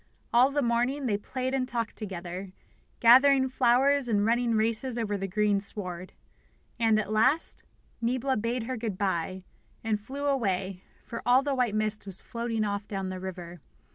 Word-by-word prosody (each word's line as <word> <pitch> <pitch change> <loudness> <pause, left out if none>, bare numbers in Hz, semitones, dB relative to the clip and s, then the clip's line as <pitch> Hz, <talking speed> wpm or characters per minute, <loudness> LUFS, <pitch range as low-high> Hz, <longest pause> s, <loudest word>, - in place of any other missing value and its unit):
All 245 +3 +6
the 285 0 0
morning 245 +4 0
they 215 -5 +1
played 255 +5 -3
and 260 -1 0
talked 235 -3 -3
together, 185 -2 -6 0.5
gathering 260 +3 +6
flowers 260 +1 +3
and 205 -2 +2
running 235 0 +2
races 230 +3 +1
over 215 -3 -1
the 195 -1 -3
green 205 +1 +1
sward. 185 -3 -4 0.7
And, 225 -2 +3
at 210 -1 -3
last, 255 +9 +2 0.4
Niebla 255 +3 0
bade 230 +2 -1
her 255 +2 -4
good 220 -4 -4
bye, 185 -1 -2 0.4
and 215 -2 -1
flew 275 +6 -6
away, 195 -9 -1 0.2
for 230 - -6
all 250 +2 +4
the 285 -1 -1
white 245 -5 0
mist 215 -1 -2
was 190 -1 -7
floating 230 -2 -3
off 200 0 -3
down 195 -2 -3
the 185 0 -5
river. 180 -2 -7
225 Hz, 170 wpm, -28 LUFS, 200-255 Hz, 0.7 s, All